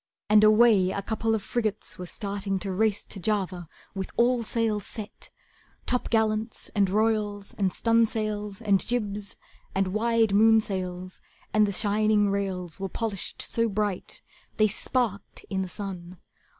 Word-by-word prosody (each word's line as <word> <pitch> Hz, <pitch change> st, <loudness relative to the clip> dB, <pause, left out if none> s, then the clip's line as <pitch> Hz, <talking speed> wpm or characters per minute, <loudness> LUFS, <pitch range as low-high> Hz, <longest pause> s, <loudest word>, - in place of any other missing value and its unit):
And 215 Hz, 0 st, +7 dB
away 215 Hz, -3 st, +6 dB
a 200 Hz, +1 st, -3 dB
couple 225 Hz, +1 st, 0 dB
of 210 Hz, -, -3 dB
frigates 215 Hz, -6 st, -2 dB
were 180 Hz, -, -6 dB
starting 200 Hz, 0 st, -3 dB
To 195 Hz, +1 st, -4 dB
race 210 Hz, +2 st, 0 dB
to 195 Hz, -, -6 dB
Java 185 Hz, -4 st, -2 dB, 0.2 s
with 190 Hz, -1 st, -4 dB
all 245 Hz, +1 st, +3 dB
sails 220 Hz, -2 st, 0 dB
set, 215 Hz, -3 st, -7 dB, 0.6 s
Topgallants, 220 Hz, -2 st, 0 dB
and 200 Hz, -3 st, +2 dB
royals, 210 Hz, -1 st, 0 dB
and 195 Hz, -2 st, +1 dB
stunsails, 215 Hz, -2 st, 0 dB
and 200 Hz, -2 st, +3 dB
jibs, 210 Hz, -4 st, -3 dB, 0.4 s
And 195 Hz, -1 st, +1 dB
wide 225 Hz, +2 st, +2 dB
moonsails; 190 Hz, -4 st, +2 dB, 0.3 s
and 215 Hz, -1 st, +4 dB
the -, -, -1 dB
shining 210 Hz, 0 st, +2 dB
rails 190 Hz, -3 st, -3 dB
Were 195 Hz, 0 st, -3 dB
polished 215 Hz, -1 st, -2 dB
so 230 Hz, 0 st, +1 dB
bright 205 Hz, -2 st, -2 dB, 0.3 s
they 215 Hz, -, +5 dB
sparked 215 Hz, -1 st, -2 dB
in 190 Hz, -1 st, 0 dB
the 185 Hz, -, -4 dB
sun. 185 Hz, -3 st, -7 dB
210 Hz, 140 wpm, -27 LUFS, 195-220 Hz, 0.6 s, And